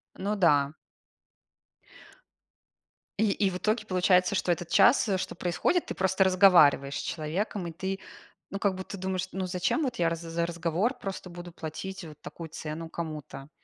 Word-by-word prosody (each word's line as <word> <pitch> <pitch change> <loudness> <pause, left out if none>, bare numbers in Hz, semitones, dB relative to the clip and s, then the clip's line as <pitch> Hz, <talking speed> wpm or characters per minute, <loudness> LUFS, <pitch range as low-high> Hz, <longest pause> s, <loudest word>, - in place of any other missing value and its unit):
Ну 205 +3 -2
да. 145 -6 +3 2.5
И 220 -2 +3
и 195 0 +1
в 180 - -4
итоге 215 +3 0
получается, 185 0 +3
что 180 - +1
этот 175 0 -2
час, 240 -2 +5
э, 190 - +2
что 185 - -4
происходит- 180 - 0
ты - - -4
просто 190 +1 +2
разговариваешь 180 -8 +5
с - - -2
человеком. 175 +5 -3
И 170 - -5
ты, 190 +3 -4 0.5
ну, 195 - -4
как 200 -1 +1
будто, 185 +2 -7
думаешь: 185 0 -2
ну, 190 -1 -3
зачем 180 - 0
вот 255 -4 -2
я 170 -7 +2
раз 165 0 -4
за 170 0 -2
разговор 170 - -1
просто 195 -3 -6
буду 175 0 -9
платить 175 +4 -6
вот 150 -2 -12
такую 165 -2 -8
цену 160 +1 -6
кому-то? 155 -4 -7
180 Hz, 165 wpm, -28 LUFS, 165-195 Hz, 2.5 s, час